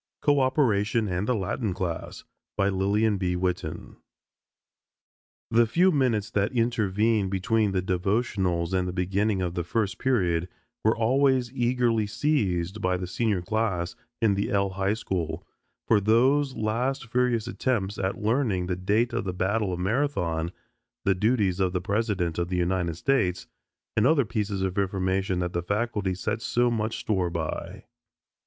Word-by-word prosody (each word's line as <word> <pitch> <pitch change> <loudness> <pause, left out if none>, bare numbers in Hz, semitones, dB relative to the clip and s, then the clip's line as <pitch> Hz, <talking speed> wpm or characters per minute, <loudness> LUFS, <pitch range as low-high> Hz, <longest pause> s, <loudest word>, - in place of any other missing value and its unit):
CO 145 -1 +4
OPERATION 115 -5 +2
AND 90 +2 -2
THE 125 - +2
LATIN 100 0 -2
CLASS 90 -4 -4 0.3
LILLIAN 100 +2 +1
B. 90 -1 0
WITTEN 90 0 -3 1.5
The 115 +1 +4
few 180 +10 +4
minutes 125 - +1
that 100 +1 +1
intervened 110 -3 +1
between 105 +2 +1
the 95 -1 0
devotionals 95 -2 0
and 90 -1 +1
the 90 - -3
beginning 95 +2 0
of 90 -1 -2
the 90 -1 -2
first 100 +1 -1
period 90 -9 +1 0.3
were 110 +2 +3
always 130 +1 +2
eagerly 120 -3 +1
seized 100 - 0
by 90 -1 +1
the 90 - -4
Senior 100 0 -1
class 95 -4 -1 0.3
in 105 -3 +4
the 100 +1 -1
L 100 -1 +1
high 95 +2 0
school 90 -7 -3 0.4
for 110 - +5
those 130 +6 +3
last 120 +5 -1
furious 120 -1 +1
attempts 105 -6 -1
at 95 0 -1
learning 110 -5 +1
the 90 0 -1
date 105 +7 +1
of 120 - -1
the 90 - -2
battle 100 +2 0
of 90 - -3
Marathon, 90 - 0 0.5
the 95 - +4
duties 100 -2 +1
of 95 -2 +1
the 90 - +1
President 100 -6 0
of 85 - 0
the 90 - -1
United 90 -1 0
States, 95 -7 +1 0.5
and 110 +2 +4
other 145 -4 +3
pieces 105 -3 -2
of 95 +1 -1
information 95 -1 0
that 90 0 -2
the 85 - 0
faculty 100 0 -1
set 110 +4 -3
so 120 +1 +1
much 110 -1 -1
store 95 -5 0
by. 85 -2 -4
100 Hz, 155 wpm, -26 LUFS, 90-115 Hz, 1.5 s, for